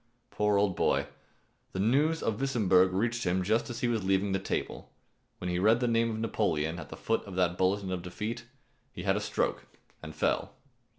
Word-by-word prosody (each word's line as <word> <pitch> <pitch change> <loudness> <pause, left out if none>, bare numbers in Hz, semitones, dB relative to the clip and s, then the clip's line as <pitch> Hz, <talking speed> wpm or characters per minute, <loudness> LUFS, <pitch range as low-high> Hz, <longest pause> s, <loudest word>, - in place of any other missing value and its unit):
Poor 105 -1 +2
old 100 -2 +2
boy! - - +2 0.7
The 95 - -3
news 145 +10 +2
of 115 +2 -1
Wissemburg 95 -9 +3
reached 115 +5 0
him 90 +1 +1
just 110 +5 +1
as 120 +1 -5
he 125 - +2
was 115 -4 0
leaving 95 +1 +1
the 95 - +1
table. 95 - -4 0.5
When 90 - -5
he 90 0 0
read 110 +5 +4
the 125 - +1
name 115 0 +2
of 110 - -3
Napoleon 85 -8 0
at 80 - -9
the - - -8
foot 115 - 0
of 95 -3 -8
that 90 -1 +2
bulletin 95 +1 0
of 90 -1 -2
defeat, 105 +7 -5 0.5
he - - -7
had - - +2
a - - -1
stroke - - -1 0.3
and 80 0 -9
fell. - - 0
100 Hz, 200 wpm, -30 LUFS, 90-115 Hz, 0.7 s, read